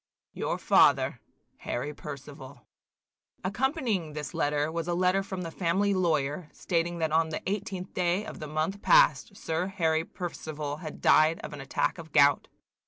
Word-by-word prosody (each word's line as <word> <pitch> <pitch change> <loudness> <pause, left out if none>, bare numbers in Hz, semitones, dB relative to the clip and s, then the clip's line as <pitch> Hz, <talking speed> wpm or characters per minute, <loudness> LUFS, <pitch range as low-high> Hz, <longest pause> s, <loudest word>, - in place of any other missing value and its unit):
"Your - - -2
father, - - +4 0.4
"HARRY 145 +5 -4
PERCIVAL." 140 -3 -10 0.8
Accompanying 215 - -1
this 150 -2 -6
letter 150 +1 0
was 165 0 -3
a 175 - 0
letter 185 +2 +2
from 190 -2 -5
the 165 - -5
family 190 +4 +1
lawyer, 155 -3 0
stating 170 -1 -1
that 160 -2 -1
on 160 0 +2
the 155 - -4
18th 190 -2 -4
day 180 +3 0
of - - -8
the 155 - -6
month 160 +7 -2
past - - +4
Sir 165 +3 -2
Harry 165 -5 0
Percival 155 -6 -5
had 155 -2 -8
died 155 +2 +5
of - - -7
an 145 - -7
attack 135 - -1
of 160 -1 -10
gout. 145 -1 +4
165 Hz, 160 wpm, -28 LUFS, 150-185 Hz, 0.8 s, died